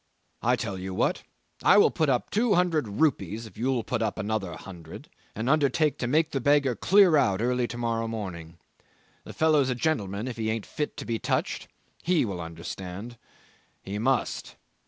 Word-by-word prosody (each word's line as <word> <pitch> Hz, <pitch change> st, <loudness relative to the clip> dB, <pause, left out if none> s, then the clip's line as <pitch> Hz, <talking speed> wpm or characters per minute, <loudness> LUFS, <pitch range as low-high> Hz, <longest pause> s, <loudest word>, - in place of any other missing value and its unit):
I -, -, +3 dB
tell 95 Hz, -2 st, -4 dB
you 95 Hz, 0 st, -5 dB
what, -, -, +1 dB, 0.4 s
I -, -, +6 dB
will 205 Hz, -, +6 dB
put 155 Hz, -4 st, +1 dB
up 125 Hz, -2 st, 0 dB
two 220 Hz, 0 st, +2 dB
hundred 170 Hz, -7 st, +2 dB
rupees 110 Hz, -, 0 dB
if 110 Hz, -, -13 dB
you 125 Hz, 0 st, 0 dB
put 125 Hz, -2 st, -2 dB
up 110 Hz, -2 st, -1 dB
another 105 Hz, -4 st, -2 dB
hundred 85 Hz, -4 st, -11 dB, 0.3 s
and 110 Hz, +3 st, -3 dB
undertake 150 Hz, +1 st, +2 dB
to 125 Hz, -, -1 dB
make 155 Hz, +5 st, +2 dB
the 135 Hz, -, -1 dB
beggar 140 Hz, -1 st, +3 dB
clear 190 Hz, -, +5 dB
out 100 Hz, -8 st, +2 dB
early 125 Hz, +1 st, +1 dB
to 120 Hz, +2 st, -7 dB
morrow 115 Hz, -1 st, -1 dB
morning. 90 Hz, -7 st, -6 dB, 0.7 s
The -, -, -9 dB
fellow's 155 Hz, -4 st, +3 dB
a 125 Hz, -, 0 dB
gentleman 110 Hz, -6 st, -1 dB
if 120 Hz, -3 st, -5 dB
he 110 Hz, -1 st, -1 dB
ain't 110 Hz, -1 st, -2 dB
fit 150 Hz, -1 st, -4 dB
to -, -, -6 dB
be 115 Hz, -1 st, -2 dB
touched -, -, -1 dB, 0.3 s
he 170 Hz, -6 st, +2 dB
will 95 Hz, -5 st, -4 dB
understand. 90 Hz, +7 st, -7 dB, 0.6 s
He 100 Hz, +2 st, -4 dB
must! 130 Hz, +2 st, -1 dB
120 Hz, 180 wpm, -27 LUFS, 100-145 Hz, 0.7 s, I